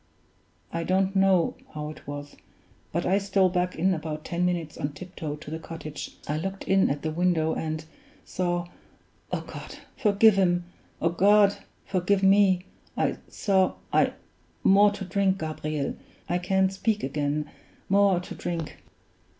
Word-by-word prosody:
I 165 0 -1
don't 190 +2 +1
know 190 -3 +4 0.2
how 150 0 -4
it - - -14
was, 145 0 -7 0.6
but 170 +2 -1
I 190 +2 +3
stole 195 -1 +2
back 180 0 0
in 185 +4 +2
about 155 -2 -5
ten 175 +1 -1
minutes 175 -3 -1
on 145 0 -3
tiptoe 160 -2 -6
to 150 0 -10
the 160 - -4
cottage; 160 -2 -7
I 150 +1 -1
looked 195 +3 -4
in 195 0 +3
at 145 +1 -2
the 160 - -1
window, 165 -1 +1
and 155 0 -3 0.4
saw 175 -1 -1 0.7
O - - -1
God! - - -9 0.2
forgive 210 -2 +5
him! 175 -2 +2 0.4
O 165 - +4
God! 200 +3 +5 0.3
forgive 190 +1 +1
me! 195 -2 +5 0.3
I - - +1
saw 190 -3 +2 0.2
I - - +4 0.5
more 200 +2 +6
to 200 -1 -6
drink, 195 0 +1
Gabriel! 155 -3 -3 0.3
I 175 - 0
can't 190 +1 +2
speak 210 +2 0
again 145 +2 -1 0.4
more 200 -2 +4
to - - -8
drink!" 165 -3 -4
180 Hz, 150 wpm, -27 LUFS, 155-195 Hz, 0.7 s, more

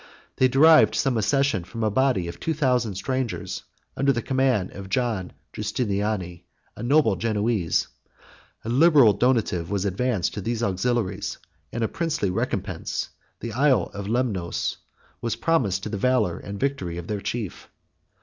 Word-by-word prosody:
They 130 - +5
derived 155 +5 +6
some 135 -3 +1
accession 115 -1 +1
from 115 +6 -6
a 110 - +1
body 125 -6 +2
of 85 - -7
two 160 - -1
thousand 125 -8 +1
strangers, 130 +3 -3 0.3
under 140 0 +2
the 120 -3 -2
command 130 -7 +1
of 95 -1 -9
John 110 -5 -1 0.2
Justiniani, 100 -6 -2 0.3
a - - -9
noble 140 +6 +3
Genoese; 105 -5 0 0.8
a - - -3
liberal 140 -4 +6
donative 105 -7 +1
was 100 -1 -1
advanced 100 0 0
to 105 - -4
these 115 +3 -2
auxiliaries; 100 0 -1 0.3
and 115 - -2
a - - +2
princely 155 - -1
recompense, - - -3 0.3
the 115 -1 -5
Isle 130 -5 +2
of 100 -1 -5
Lemnos, 110 -7 -1 0.4
was 115 -2 -1
promised 115 - +1
to - - -3
the 100 - -3
valor 125 -7 +1
and 100 0 -7
victory 100 -12 -2
of 85 - -6
their 105 +1 -3
chief. 110 -5 -5
115 Hz, 150 wpm, -24 LUFS, 100-130 Hz, 0.8 s, derived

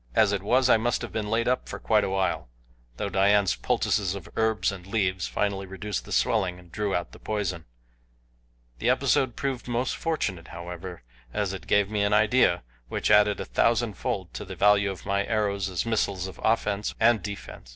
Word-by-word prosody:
As 105 - +5
it 100 -2 -1
was 125 +6 +3
I 120 - +6
must 120 +2 -1
have 120 - -6
been 105 -2 -3
laid 115 +1 +1
up 125 +1 0
for - - -5
quite 110 -2 +2
a - - -1
while, 95 -9 -1 0.5
though - - -2
Dian's 100 -3 +3
poultices 95 - 0
of 95 -4 -8
herbs 110 -1 +1
and 95 -2 -9
leaves 95 -4 0
finally 100 -1 -1
reduced 95 +1 -4
the - - -11
swelling 90 -2 +1
and 90 -1 -17
drew 105 +1 -1
out 90 -1 -2
the - - -14
poison. 95 -6 -3 1.1
The - - +1
episode 130 -3 +2
proved 135 -3 -3
most 120 +1 -1
fortunate, 100 - -2
however, 85 -2 -8 0.3
as 100 -2 0
it 90 -2 -8
gave 100 +1 +2
me 105 -1 0
an 100 +1 +2
idea 105 - +4 0.2
which - - -1
added 105 -1 +5
a - - -3
thousand - - +1
fold - - -4
to - - -5
the - - -8
value 100 0 +4
of 95 -2 -7
my 100 0 +1
arrows 100 -3 0
as 90 +2 -2
missiles 100 -5 0
of 95 - -9
offense 105 -2 0
and 115 -2 +4
defense. 100 -9 -8
100 Hz, 195 wpm, -26 LUFS, 95-110 Hz, 1.1 s, I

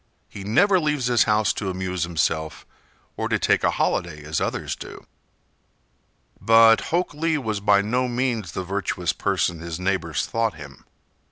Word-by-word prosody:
He 100 - -9
never 185 - +3
leaves 150 -5 -1
his 120 -2 +3
house 105 -1 +2
to 100 - -4
amuse 90 -2 -2
himself 80 -2 -2 0.5
or - - -3
to - - +2
take - - +1
a - - +4
holiday 75 -3 -1
as 80 +2 -2
others - - -2
do!" - - -11 1.4
But 115 0 +6
Hok 175 -1 0
Lee 160 +1 0
was 110 -7 -3
by 100 0 +3
no 125 +4 0
means 120 -7 -2
the 95 - -3
virtuous 95 -2 -2
person 90 -4 -1
his 85 0 -6
neighbors 90 -4 -1
thought 115 -1 -1
him. - - -12
100 Hz, 160 wpm, -23 LUFS, 90-120 Hz, 1.4 s, But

